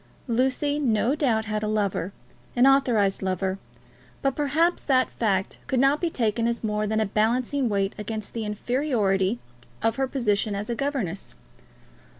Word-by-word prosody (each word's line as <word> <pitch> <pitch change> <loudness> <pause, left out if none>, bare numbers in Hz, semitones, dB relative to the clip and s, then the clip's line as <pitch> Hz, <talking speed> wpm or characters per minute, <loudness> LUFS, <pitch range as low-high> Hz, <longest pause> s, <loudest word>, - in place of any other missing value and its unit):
Lucy 265 +4 +1
no 240 -2 +2
doubt 240 -7 +1
had 215 -1 -2
a 215 - -1
lover, 200 -4 -1 0.4
an 245 +1 +5
authorised 245 -8 +3
lover; 190 0 -1 0.6
but 270 -1 +1
perhaps 310 +4 +1
that 260 -2 +2
fact 195 -4 -1
could 265 -3 +1
not 275 +3 +3
be 345 - +1
taken 230 -4 0
as 235 0 -2
more 210 -1 0
than 220 +1 0
a 220 - +2
balancing 235 +5 +1
weight 195 -1 0
against 215 0 -5
the 230 - -3
inferiority 210 -3 0 0.5
of 225 0 +1
her 270 0 +1
position 215 -5 0
as 205 +4 -3
a - - -1
governess. 245 - -3
225 Hz, 155 wpm, -25 LUFS, 210-270 Hz, 0.6 s, an